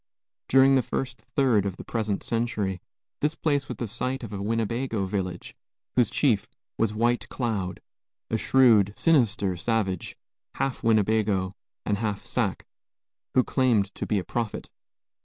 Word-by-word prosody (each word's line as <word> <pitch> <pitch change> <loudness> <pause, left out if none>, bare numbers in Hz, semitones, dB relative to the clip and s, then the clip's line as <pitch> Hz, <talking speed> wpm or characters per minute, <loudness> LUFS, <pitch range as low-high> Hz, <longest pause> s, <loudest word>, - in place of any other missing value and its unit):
During 135 +1 +6
the 130 - +5
first 130 +1 -4
third 125 -8 +4
of 100 -2 -3
the - - -8
present 110 -4 -2
century, 110 -6 -1 0.4
this 150 +2 0
place 145 -4 0
was - - -5
the 120 - -3
site 130 +5 -3
of 105 - -7
a 100 - -4
Winnebago 115 0 -1
village, 95 -1 -4 0.4
whose 120 -4 +4
chief 120 -9 +2 0.3
was 115 -2 +1
White 120 +2 +1
Cloud, 100 -8 -2 0.5
a - - +2
shrewd, 110 -4 +4
sinister 110 - +2
savage, 95 -2 -1 0.4
half 135 -2 -2
Winnebago 105 -4 +2 0.3
and 100 -1 0
half 105 -3 -2
Sac, - - -1 0.7
who 130 - +6
claimed 115 -8 +2
to - - -5
be 105 - +1
a 95 - -1
prophet. 115 +4 -4
110 Hz, 145 wpm, -26 LUFS, 100-125 Hz, 0.7 s, During